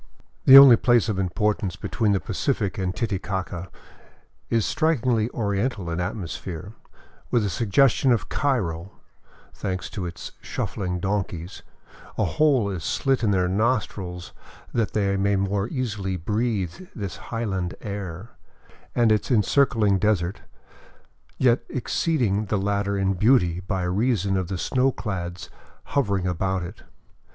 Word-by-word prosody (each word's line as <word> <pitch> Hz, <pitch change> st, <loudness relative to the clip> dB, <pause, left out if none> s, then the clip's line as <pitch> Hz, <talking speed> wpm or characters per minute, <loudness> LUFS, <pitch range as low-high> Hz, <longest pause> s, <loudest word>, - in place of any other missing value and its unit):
The 135 Hz, -, +11 dB
only 135 Hz, -4 st, +10 dB
place 120 Hz, -2 st, +3 dB
of 100 Hz, -3 st, -1 dB
importance 95 Hz, 0 st, 0 dB
between 105 Hz, +6 st, -1 dB
the 100 Hz, -, +2 dB
Pacific 95 Hz, +4 st, -2 dB
and 90 Hz, -1 st, -2 dB
Titicaca 95 Hz, -4 st, -3 dB, 0.8 s
is 115 Hz, -3 st, +1 dB
strikingly 125 Hz, -8 st, +1 dB
oriental 100 Hz, -4 st, -2 dB
in 85 Hz, -, -2 dB
atmosphere, 90 Hz, +1 st, -5 dB, 0.6 s
with 115 Hz, -4 st, +2 dB
a 100 Hz, -, -1 dB
suggestion 125 Hz, -, +3 dB
of 120 Hz, -, +1 dB
Cairo, 100 Hz, -, -1 dB, 0.6 s
thanks 95 Hz, -2 st, -4 dB
to 90 Hz, -4 st, -4 dB
its 85 Hz, -, -8 dB
shuffling 90 Hz, -2 st, -3 dB
donkeys 95 Hz, -2 st, -3 dB, 0.3 s
— -, -, -20 dB
a -, -, +2 dB
hole 145 Hz, -8 st, +2 dB
is 90 Hz, -5 st, -5 dB
slit 130 Hz, -, 0 dB
in 110 Hz, -, +3 dB
their 90 Hz, -2 st, +2 dB
nostrils 95 Hz, -4 st, -1 dB, 0.4 s
that 115 Hz, -4 st, 0 dB
they 100 Hz, -2 st, +1 dB
may 100 Hz, +1 st, +2 dB
more 100 Hz, +1 st, 0 dB
easily 105 Hz, -8 st, -3 dB
breathe 105 Hz, -, -2 dB
this 100 Hz, -3 st, -5 dB
highland 95 Hz, -6 st, -2 dB
air 100 Hz, 0 st, -6 dB, 0.3 s
— -, -, -27 dB
and 120 Hz, -2 st, +4 dB
its 110 Hz, -, +1 dB
encircling 110 Hz, -4 st, +3 dB
desert, 100 Hz, -3 st, 0 dB, 1.0 s
yet 125 Hz, -1 st, +3 dB
exceeding 120 Hz, -, 0 dB
the 105 Hz, +1 st, -1 dB
latter 100 Hz, 0 st, -1 dB
in 95 Hz, 0 st, +1 dB
beauty 90 Hz, -4 st, +3 dB
by 95 Hz, 0 st, -3 dB
reason 100 Hz, +1 st, +1 dB
of 95 Hz, -2 st, -1 dB
the 95 Hz, -, -3 dB
snowclads 95 Hz, -7 st, -2 dB, 0.3 s
hovering 100 Hz, -9 st, 0 dB
about 95 Hz, +1 st, -1 dB
it. 90 Hz, +5 st, -9 dB
100 Hz, 135 wpm, -24 LUFS, 95-115 Hz, 1.0 s, The